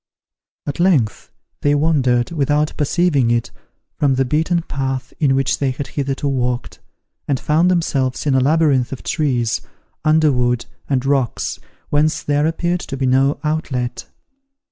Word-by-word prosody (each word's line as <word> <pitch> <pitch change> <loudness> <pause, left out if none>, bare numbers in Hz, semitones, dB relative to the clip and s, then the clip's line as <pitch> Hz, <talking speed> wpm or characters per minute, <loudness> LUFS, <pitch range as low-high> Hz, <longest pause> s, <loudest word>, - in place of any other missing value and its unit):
At 145 - -4
length 155 - +1 0.3
they 145 0 +3
wandered, 135 -5 +2
without 150 -1 0
perceiving 145 -4 +2
it, 120 -1 0 0.4
from 140 -3 +1
the 135 +1 +1
beaten 160 +5 0
path 135 -3 -3
in 135 -4 +3
which 135 0 0
they 140 - +1
had 135 +2 -4
hitherto 140 0 -2
walked, 125 -3 -2 0.5
and 135 -3 0
found 160 +4 +2
themselves 140 -8 0
in 145 - +2
a 130 - +4
labyrinth 140 -2 +2
of 135 - -7
trees, 125 -8 0 0.4
underwood, 135 -6 +2 0.2
and 135 -2 0
rocks, 135 -4 0 0.3
whence 150 +1 +1
there 145 +1 +1
appeared 175 +2 -1
to 135 -5 -6
be 135 - -1
no 135 +2 +2
outlet. 130 -6 -2
140 Hz, 145 wpm, -19 LUFS, 130-155 Hz, 0.5 s, a